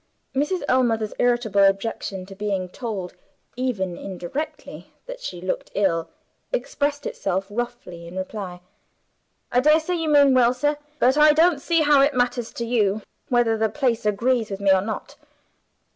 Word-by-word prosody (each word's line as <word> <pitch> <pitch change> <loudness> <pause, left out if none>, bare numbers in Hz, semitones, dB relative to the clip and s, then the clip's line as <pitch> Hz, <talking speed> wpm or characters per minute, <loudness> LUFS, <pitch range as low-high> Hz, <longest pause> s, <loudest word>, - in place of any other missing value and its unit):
Mrs. 295 +7 0
Ellmother's 230 -4 +1
irritable 240 -5 +2
objection 195 -1 0
to 195 - -11
being 195 -2 -2
told 195 -4 -5 0.4
(even 205 -9 -2
indirectly) 195 - -6
that - - -8
she 180 - -6
looked 185 +1 -3
ill, 170 -5 +1 0.4
expressed 290 - -2
itself 195 0 -2
roughly 230 -7 -5
in 175 +2 -9
reply. 185 -2 -5 0.9
"I 245 - +3
daresay 310 +5 +3
you 325 -3 -1
mean 285 -2 +6
well, 250 -1 +4
sir 295 +2 0 0.2
but 260 +3 +3
I 300 0 +7
don't 320 -1 +3
see 335 +1 +2
how 290 -2 +5
it 280 0 +3
matters 245 -1 0
to 235 - -4
you 215 -3 +1 0.3
whether 240 -2 +3
the 220 0 +2
place 240 -1 0
agrees 225 +2 +1
with 195 -1 -5
me 200 -1 +3
or 190 -1 +4
not." 215 +3 -6
235 Hz, 155 wpm, -23 LUFS, 195-280 Hz, 0.9 s, I